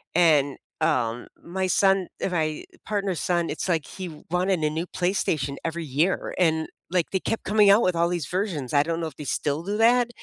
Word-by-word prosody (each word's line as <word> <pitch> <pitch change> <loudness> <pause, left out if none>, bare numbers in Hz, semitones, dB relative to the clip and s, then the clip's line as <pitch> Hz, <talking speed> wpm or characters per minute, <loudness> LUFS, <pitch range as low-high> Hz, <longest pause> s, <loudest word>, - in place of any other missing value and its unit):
and 150 -5 +4 0.2
um 120 -1 0 0.2
my 185 +2 -2
son, 195 -1 +3
ri - - 0
my 155 -2 -1 0.2
partner's 200 -5 -1
son, 175 -2 0
it's 155 - -3
like 165 -4 +1
he 175 -5 -8
wanted 180 0 +1
a 150 - +3
new 160 +3 -3
PlayStation 160 -6 -1
every 165 0 -3
year, 150 +7 0
and 160 -3 +2 0.2
like 175 -1 0
they 190 - +1
kept 225 - -2
coming 210 0 +5
out 205 +4 +6
with 180 -2 +2
all 170 +1 +2
these 170 -5 -2
versions. 175 - -2
I 145 - +5
don't 165 +1 -2
know 165 - -2
if 145 - -10
they 150 - -8
still 145 +3 -1
do 200 +3 -2
that, 240 +2 +4
170 Hz, 205 wpm, -25 LUFS, 155-190 Hz, 0.2 s, out